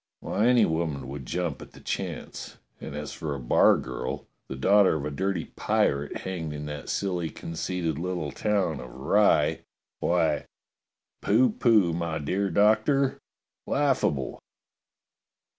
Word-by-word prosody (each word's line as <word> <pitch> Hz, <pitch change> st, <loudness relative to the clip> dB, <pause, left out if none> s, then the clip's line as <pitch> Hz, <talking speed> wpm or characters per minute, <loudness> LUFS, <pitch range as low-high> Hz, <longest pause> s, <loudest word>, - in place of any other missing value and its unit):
^^ -, -, -62 dB, 0.2 s
Why, 110 Hz, +3 st, 0 dB
any 120 Hz, -3 st, +5 dB
woman 80 Hz, -5 st, -2 dB
would 70 Hz, -2 st, -7 dB
jump 85 Hz, -4 st, -2 dB
at -, -, -12 dB
the -, -, -13 dB
chance! -, -, -5 dB, 0.2 s
And -, -, -7 dB
as 75 Hz, 0 st, -5 dB
for 75 Hz, -3 st, -4 dB
a -, -, -5 dB
bargirl, 65 Hz, +2 st, +2 dB, 0.2 s
the -, -, -5 dB
daughter 100 Hz, +7 st, +4 dB
of 75 Hz, -2 st, -3 dB
a 75 Hz, -, -3 dB
dirty 95 Hz, +2 st, -1 dB
pirate 70 Hz, +1 st, 0 dB
hanged 85 Hz, -5 st, -4 dB
in 75 Hz, 0 st, -6 dB
that 75 Hz, -1 st, -6 dB
silly 90 Hz, -4 st, -1 dB
conceited 80 Hz, -1 st, -3 dB
little 85 Hz, -4 st, -3 dB
town 95 Hz, -2 st, 0 dB
of 65 Hz, -, -8 dB
Rye, 75 Hz, -, +3 dB, 0.4 s
why, -, -, +1 dB, 0.7 s
pooh 115 Hz, +4 st, +4 dB
pooh, 105 Hz, -8 st, +3 dB
my 85 Hz, -1 st, -2 dB
dear 95 Hz, +7 st, -1 dB
Doctor! 110 Hz, -, +3 dB, 0.5 s
Laugh 140 Hz, -2 st, +2 dB
able!" 65 Hz, -3 st, -1 dB
85 Hz, 140 wpm, -27 LUFS, 75-100 Hz, 0.7 s, any